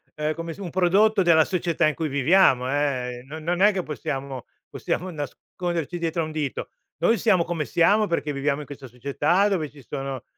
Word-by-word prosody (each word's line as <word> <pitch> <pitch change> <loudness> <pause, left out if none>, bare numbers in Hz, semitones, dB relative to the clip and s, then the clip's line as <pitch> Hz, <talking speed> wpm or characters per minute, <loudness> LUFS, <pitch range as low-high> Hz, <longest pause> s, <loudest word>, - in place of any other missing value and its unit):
uhm, 150 0 -1
come 165 0 -5
s - - -16
un 185 - -5
prodotto 195 +4 +3
della 160 -2 +5
società 170 -3 +1
in 155 - +1
cui 160 - -2
viviamo, 140 -2 +4
eh, 130 -4 -1
no 150 +4 -8
non 175 +3 -2
è 210 +1 +7
che 190 -2 -2
possiamo 135 -2 -5 0.2
possiamo 185 +2 -3
nasconderci 170 +2 -4
dietro 165 0 -1
a - - -1
un 155 - -7
dito. 150 -3 -3 0.3
Noi 225 +7 +3
siamo 190 -7 +3
come 165 -4 -3
siamo, 205 +5 +3
perché 160 -4 -1
viviamo 140 +1 -1
in - - -8
questa 140 -2 -10
società 140 - +1
dove 175 -7 -1
ci 140 -3 -15
sono, 135 -3 -5
155 Hz, 195 wpm, -24 LUFS, 140-175 Hz, 0.3 s, è